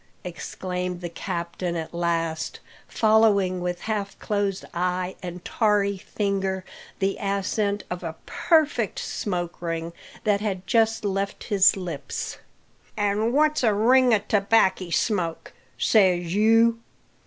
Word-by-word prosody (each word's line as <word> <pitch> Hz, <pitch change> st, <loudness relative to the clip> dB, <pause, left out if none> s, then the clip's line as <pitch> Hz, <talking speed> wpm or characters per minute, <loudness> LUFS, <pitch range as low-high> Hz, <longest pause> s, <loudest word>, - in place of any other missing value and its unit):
exclaimed 180 Hz, +1 st, -4 dB
the 175 Hz, -1 st, -5 dB
captain 170 Hz, +1 st, -4 dB
at 160 Hz, 0 st, -5 dB
last, 165 Hz, -2 st, -1 dB, 0.3 s
following 210 Hz, -4 st, +3 dB
with 175 Hz, 0 st, -3 dB
half 210 Hz, -3 st, -3 dB
closed 200 Hz, -2 st, -2 dB
eye 180 Hz, +1 st, -1 dB
and 180 Hz, -1 st, -7 dB
tarry 205 Hz, -3 st, +2 dB
finger 195 Hz, -1 st, -2 dB, 0.3 s
the 195 Hz, 0 st, 0 dB
ascent 200 Hz, +1 st, -1 dB
of 180 Hz, 0 st, -5 dB
a 160 Hz, -1 st, -5 dB
perfect 295 Hz, -, +1 dB
smoke 175 Hz, -4 st, -3 dB
ring 165 Hz, 0 st, -3 dB, 0.3 s
that 205 Hz, -2 st, +2 dB
had 190 Hz, -3 st, -3 dB
just 225 Hz, 0 st, +2 dB
left 195 Hz, 0 st, -2 dB
his 195 Hz, -1 st, +4 dB
lips. 170 Hz, -7 st, -5 dB, 0.6 s
"An' 205 Hz, +2 st, +1 dB
what's 305 Hz, +3 st, +3 dB
a 215 Hz, -3 st, +3 dB
ring 250 Hz, +4 st, +5 dB
o' 220 Hz, -, +6 dB
tobackie 200 Hz, -2 st, +2 dB
smoke? 170 Hz, -3 st, -1 dB, 0.2 s
says 180 Hz, -5 st, +3 dB
you. 225 Hz, +2 st, +4 dB
195 Hz, 120 wpm, -25 LUFS, 180-215 Hz, 0.6 s, o